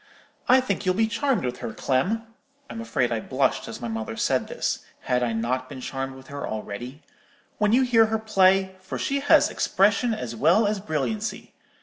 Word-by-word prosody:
I 260 +1 +7
think 200 -6 -2
you'll 185 -2 +1
be 225 +2 +3
charmed 235 - 0
with 125 0 -3
her, 110 - -5
Clem'—(I'm 225 - -3
afraid 130 - 0
I 115 - 0
blushed 130 +4 0
as 115 - -7
my 120 - -4
mother 110 0 -4
said - - +1
this; - - -2 0.2
had 125 0 0
I 120 -1 0
not 125 +3 -2
been 140 - -8
charmed 135 +1 -4
with 130 0 -13
her 140 0 -5
already?)—'when 125 - -5
you 255 +3 +5
hear 230 -3 +4
her 220 0 0
play, 195 -3 +3
for 185 - -6
she 280 0 -1
has 285 - +4
expression 210 +4 +2
as 120 - -5
well 170 - +4
as 205 0 0
brilliancy. 205 - -3
190 Hz, 185 wpm, -25 LUFS, -, 0.2 s, I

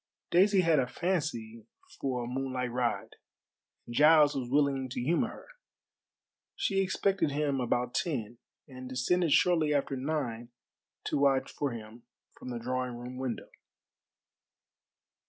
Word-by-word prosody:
Daisy 195 +2 +5
had 165 -4 +3
a 125 - +1
fancy 125 - -3 0.3
for 125 -3 -2
a - - -5
moonlight 130 -1 -2
ride, 120 -1 -2 0.7
and 120 - -8
Giles 150 +1 +6
was 125 -3 -3
willing 135 -1 +1
to 125 - -4
humor 155 +8 +1
her. - - -11 1.1
She 195 -1 +1
expected 195 -2 +1
him 145 -2 0
about 125 0 0
ten, 120 - -2 0.3
and 130 -2 -9
descended 160 +7 +1
shortly 160 -2 +4
after 140 -1 0
nine 130 -4 -3 0.5
to - - -1
watch 135 -1 +2
for 145 - -2
him 115 -1 -9 0.3
from - - -10
the 120 - -4
drawing 125 +1 -3
room 125 +1 -8
window. 130 -2 -4
130 Hz, 135 wpm, -30 LUFS, 125-150 Hz, 1.1 s, Giles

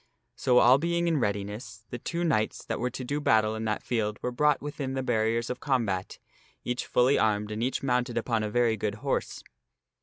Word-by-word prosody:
So, 125 -1 +2
all 125 +2 +7
being 170 +2 0
in 165 -3 +2
readiness, 105 0 -3
the 125 - -5
two 170 +7 -3
knights 110 -11 0
that - - -3
were 125 - 0
to 130 +1 -6
do 145 +4 -2
battle 110 -5 +3
in 110 0 -4
that 110 -1 -1
field 105 -3 -1
were 125 - -1
brought 150 +3 +2
within 140 -2 -4
the 130 - -1
barriers 115 -1 0
of 125 - -5
combat, 110 -9 -1 0.5
each 125 +1 -3
fully 125 +3 +3
armed 105 -1 +1
and 105 +1 -3
each 130 +3 -1
mounted 125 -2 0
upon 115 -1 0
a 105 - -2
very 120 0 +2
good 105 0 -2
horse. - - -2
120 Hz, 205 wpm, -28 LUFS, 110-130 Hz, 0.5 s, all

